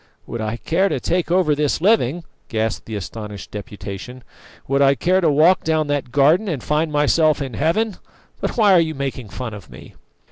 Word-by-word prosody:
"Would 115 - -5
I 110 +1 -3
care 185 +9 +1
to - - -1
take 175 -1 -1
over 175 -3 +3
this 145 -1 0
living?" 175 - +2 0.3
gasped 110 -1 -2
the 110 - -5
astonished 105 0 -7
Deputation. 105 +3 -8 0.4
"Would 140 +1 +1
I 140 0 +5
care 185 +6 +2
to 165 - +3
walk 155 +6 +4
down 155 -1 +1
that 145 -4 -2
garden 150 - +3
and 150 -9 -3
find 155 +1 0
myself 150 +1 +3
in 135 -3 -5
Heaven? 180 - 0 0.4
But - - -3
why 210 -4 +5
are 180 - +6
you 160 -2 0
making 135 -5 -4
fun 110 +3 -6
of 105 -3 -11
me?" - - -13
145 Hz, 190 wpm, -20 LUFS, 120-170 Hz, 0.4 s, are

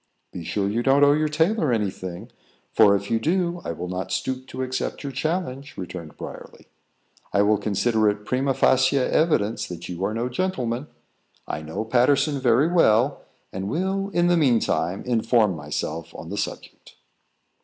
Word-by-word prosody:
"Be 90 - -7
sure 100 +3 -1
you 110 +4 0
don't 135 +3 +4
owe 145 0 +6
your 155 +1 +1
tailor 160 - +1
any 105 -4 +1
thing, 95 +5 -8 0.4
for 105 -2 +5
if 100 +2 -4
you 115 - +2
do, 175 +5 0
I - - -3
will 85 +2 -5
not 90 +1 -4
stoop 130 0 -2
to 130 - -4
accept 130 +3 -3
your 140 - -4
challenge," 140 -1 -3
returned 85 -4 -7
Briarly. - - -10 0.7
"I 100 - +3
will 105 0 +3
consider 110 +1 +2
it 105 0 -4
primâ 130 +3 0
facie 130 +2 +3
evidence 130 -5 +1
that 85 -1 -7
you 90 +1 -5
are 105 +3 -1
no 120 +2 -1
gentleman. 125 -3 -2 0.6
I 75 - -4
know 80 +8 -5
Patterson 140 +5 +2
very 130 +3 +3
well, 140 -6 +3 0.3
and 95 +1 -4
will, 190 - -1
in 175 -3 +1
the 175 0 +4
mean 130 -8 +4
time, 95 -2 -1
inform 115 -4 +2
myself 75 +2 -5
on - - -8
the - - -3
subject." - - -6
120 Hz, 175 wpm, -24 LUFS, 100-145 Hz, 0.7 s, owe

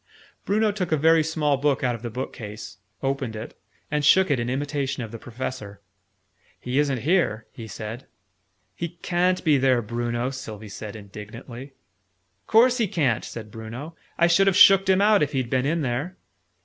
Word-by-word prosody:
Bruno 215 +1 +2
took 195 -4 -3
a 155 - +3
very 160 +2 +5
small 150 -2 0
book 145 0 0
out 125 -1 +1
of 115 - -7
the 120 - -5
bookcase, 105 -4 -7 0.2
opened 135 -4 -2
it, 110 +2 -7 0.4
and 150 -1 0
shook 185 +3 +5
it 135 - +2
in 120 +1 -2
imitation 135 -1 -2
of 110 - -8
the 115 - -8
Professor. 115 -4 -6 0.8
"He 125 +3 -1
isn't 140 -5 0
here," 140 - +1
he 115 - -9
said. 110 +4 -7 0.7
"He 170 +5 -6
ca'n't 180 +1 +1
be 150 -5 +4
there, 130 -2 +3
Bruno!" 120 +3 -2
Sylvie 110 -5 -8
said 105 +1 -8
indignantly. 115 +6 -10 0.7
"Course 245 +3 +5
he 225 - +2
ca'n't!" 140 - 0
said 110 -2 -8
Bruno. 115 +9 -8 0.2
"I 170 - +4
should 175 +3 +4
have 195 -1 +3
shooked 195 -1 +7
him 190 +1 +4
out, 210 0 +5
if 150 0 0
he'd 130 -3 -2
been 130 +1 +1
in 165 +2 0
there!" 140 +8 -3
135 Hz, 175 wpm, -24 LUFS, 115-165 Hz, 0.8 s, shooked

